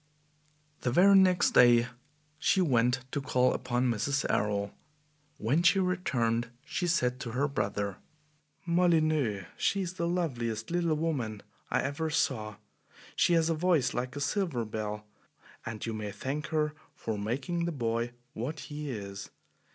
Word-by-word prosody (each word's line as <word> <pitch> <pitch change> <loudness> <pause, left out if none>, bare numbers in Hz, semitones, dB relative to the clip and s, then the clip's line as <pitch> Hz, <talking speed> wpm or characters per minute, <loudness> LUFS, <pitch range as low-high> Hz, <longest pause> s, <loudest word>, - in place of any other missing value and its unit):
The 125 - -1
very 185 +9 +6
next 185 -2 +5
day 120 -1 +6 0.5
she 190 - +3
went 125 -6 +2
to 145 - -1
call 125 -1 +2
upon 125 +1 0
Mrs. 140 +6 0
Errol. 100 -1 0 0.6
When 130 +10 +1
she 175 +3 +5
returned, 120 -11 0 0.2
she 175 +4 -2
said 125 -7 +1
to 120 -5 -5
her 140 +3 +1
brother: 100 -7 -2 0.7
"Molyneux, 155 - +2
she 200 - +1
is 180 -1 -3
the 170 -2 -2
loveliest 120 -10 -2
little 170 -2 +1
woman 130 -10 -2 0.3
I - - +1
ever 155 +3 -2
saw! 110 -8 0 0.6
She 175 - +3
has 165 0 +3
a - - +3
voice 160 -6 +2
like 125 +2 -3
a - - -4
silver 150 - 0
bell, 105 -1 -4 0.6
and 115 -1 -5
you 115 - -3
may 105 -1 -4
thank 140 +6 -4
her 150 -1 0 0.2
for 110 -2 -4
making 135 +11 -2
the 170 - -1
boy 120 -3 -1 0.2
what 140 +7 -4
he 150 0 -6
is. 100 -4 -6
130 Hz, 150 wpm, -30 LUFS, 115-165 Hz, 0.7 s, very